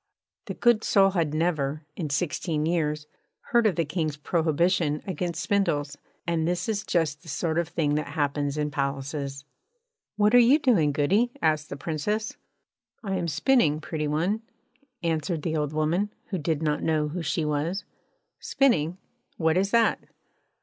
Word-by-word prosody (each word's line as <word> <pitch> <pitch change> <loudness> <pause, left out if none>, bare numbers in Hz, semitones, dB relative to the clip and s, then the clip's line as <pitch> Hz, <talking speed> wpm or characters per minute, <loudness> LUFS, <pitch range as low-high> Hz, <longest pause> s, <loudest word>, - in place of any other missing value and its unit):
The - - -5
good 240 -2 +3
soul 195 -2 +4
had 165 -5 0
never, 155 -2 -1
in 160 -5 -3
sixteen 155 +1 -1
years, 150 -3 0 0.5
heard 235 -2 +5
of 195 - +1
the 165 - +1
King's 155 -1 -2
prohibition 160 0 +1
against 175 -2 -3
spindles; 155 -8 0 0.3
and 165 -2 0
this 180 0 -1
is 210 -2 -1
just 160 -5 0
the 175 - -18
sort 160 +2 -1
of 170 - -1
thing 160 -3 0
that 150 +1 -1
happens 145 -1 -1
in 150 0 -1
palaces. 140 0 -3 0.7
'What 210 +2 +3
are 245 - +9
you 245 +5 +6
doing, 220 - +3
goody?' 190 - +2
asked 155 - +1
the 140 - -6
Princess. 175 +9 -2 0.7
'I 195 -2 -2
am 180 -2 -1
spinning, 155 - +2
pretty 155 -1 -3
one,' 175 +9 0 0.6
answered 160 -1 -1
the 160 -2 -1
old 150 -2 -1
woman, 160 +7 0 0.2
who 185 - -2
did 160 0 -1
not 150 -1 0
know 155 -2 +1
who 175 +4 -4
she 160 0 -1
was. 150 +6 -1 0.6
'Spinning? 180 - +1 0.4
What 160 -1 +2
is 195 +2 +2
that?' 230 +1 +3
160 Hz, 160 wpm, -26 LUFS, 150-185 Hz, 0.7 s, are